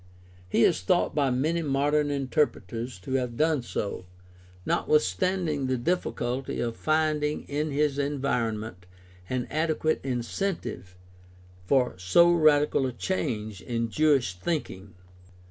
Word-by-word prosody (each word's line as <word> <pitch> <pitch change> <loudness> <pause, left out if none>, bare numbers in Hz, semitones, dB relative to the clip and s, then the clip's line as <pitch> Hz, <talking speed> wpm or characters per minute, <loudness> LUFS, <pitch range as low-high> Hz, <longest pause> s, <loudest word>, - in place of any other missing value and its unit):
He - - +3
is - - +3
thought 175 - +1
by 145 -2 +2
many 155 +7 0
modern 145 0 +1
interpreters 130 - -1
to 110 - -5
have 125 -3 -1
done 155 -3 +2
so, 100 -5 -4 0.6
notwithstanding 150 - +1
the 130 0 0
difficulty 130 -3 -2
of 115 -1 -2
finding 155 -1 0
in 150 +2 -2
his 145 0 0
environment 115 -9 -2 0.4
an 130 -1 -1
adequate 155 0 0
incentive 125 - -3 0.7
for 125 -7 +2
so 170 - +5
radical 150 -4 +4
a - - -3
change 110 - -3
in 115 -1 -2
Jewish 140 -7 +2
thinking. 100 - -4
135 Hz, 115 wpm, -27 LUFS, 115-155 Hz, 0.7 s, so